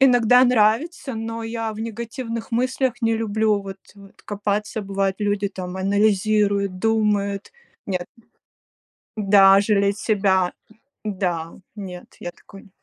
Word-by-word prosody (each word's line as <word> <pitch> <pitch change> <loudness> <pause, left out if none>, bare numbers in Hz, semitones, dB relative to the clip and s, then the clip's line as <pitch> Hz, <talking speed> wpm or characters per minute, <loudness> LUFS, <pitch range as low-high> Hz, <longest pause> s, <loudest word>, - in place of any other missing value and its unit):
Иногда 250 -1 +6
нравится, 250 +6 +2
но 225 +1 -4
я 225 -1 -3
в 215 - -8
негативных 230 +1 -5
мыслях 255 +1 0
не 225 0 +2
люблю 215 -1 +1
вот, 195 0 -8 0.2
э, 200 -1 -14
копаться. 205 +1 -2
Бывает, 195 -1 -1
люди 205 -1 0
там 185 -1 -7
анализируют, 200 0 +1
думают. 205 -2 0 0.3
Нет 185 -2 -2 1.1
Да, 195 -2 +6
жалеть 200 -1 +1
себя. 190 -5 +2 0.5
Да, 180 -5 -2 0.2
нет, 185 -4 -9
я 175 - -5
такой 195 +3 -16
210 Hz, 115 wpm, -22 LUFS, 195-225 Hz, 1.1 s, Иногда